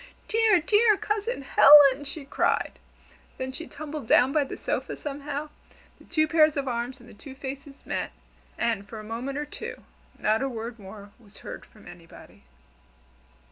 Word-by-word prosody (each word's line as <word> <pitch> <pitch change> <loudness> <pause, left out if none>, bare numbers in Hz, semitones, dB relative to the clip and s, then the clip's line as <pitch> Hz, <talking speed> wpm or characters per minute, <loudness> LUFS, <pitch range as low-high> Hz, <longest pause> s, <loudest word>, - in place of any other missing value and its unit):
dear, 440 -4 +4
dear 420 +5 +4
Cousin 420 - -2
Helen!" 285 0 +7
she 285 0 -7
cried. 275 - 0 0.6
Then 260 0 -4
she 325 +5 -8
tumbled 300 -3 -7
down 255 +4 +4
by 300 - +3
the 275 - -7
sofa - - -3
somehow, 290 +1 -5 0.5
the - - -18
two 310 -2 +1
pairs 310 -1 +4
of 275 -1 -2
arms 245 +2 -3
and 240 - -16
the - - -14
two 265 +6 -12
faces 275 +1 -8
met, - - -3 0.5
and 220 -4 -1
for 220 - -7
a - - -9
moment 240 +6 -5
or 295 - -2
two 295 - -8 0.3
not 215 +2 +1
a 270 - -1
word 230 -1 -6
more 200 +1 -11
was 210 -3 -19
heard - - -8
from 215 - -18
anybody. 170 -1 -15
275 Hz, 170 wpm, -26 LUFS, 235-305 Hz, 0.6 s, Helen